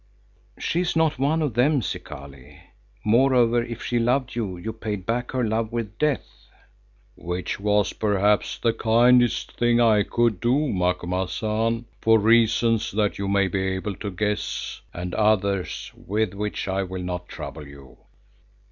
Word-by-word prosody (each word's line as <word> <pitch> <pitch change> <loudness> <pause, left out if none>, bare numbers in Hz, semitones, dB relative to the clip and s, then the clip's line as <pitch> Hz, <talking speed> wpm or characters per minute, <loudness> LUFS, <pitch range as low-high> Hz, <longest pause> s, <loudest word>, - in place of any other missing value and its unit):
"She 170 - -1
is 175 -2 -1
not 160 -4 +2
one 155 +4 +1
of 145 -6 -1
them, 130 +3 +2
Zikali. 70 -7 -8 0.5
Moreover, 120 +1 +4
if 115 0 -7
she 120 - 0
loved 125 +2 +1
you, 100 -6 -3
you 110 +6 -5
paid 105 -4 -5
back 120 +2 -1
her 130 -1 -1
love 110 0 -1
with 115 -2 -4
death." 150 -3 -2 0.7
"Which 90 +2 -4 0.4
perhaps 105 -1 +2
was - - -25
the 115 -1 +3
kindest 120 +2 +4
thing 120 0 +3
I 110 -3 +5
could 115 -1 +1
do, 135 +5 +1
Macumazahn, 95 +6 -1 0.2
for 115 0 +5
reasons 115 +1 +3
that 105 -1 0
you 100 - -2
may 100 0 +2
be 95 +1 -2
able 95 +2 -2
to 105 - -4
guess, 105 +2 -3
and 90 +1 -6
others 100 -3 0
with 105 0 -2
which 105 +1 -4
I 95 0 0
will 95 -1 -5
not 90 0 -5
trouble 75 -3 -8
you. 70 -2 -15
110 Hz, 150 wpm, -24 LUFS, 95-120 Hz, 0.7 s, I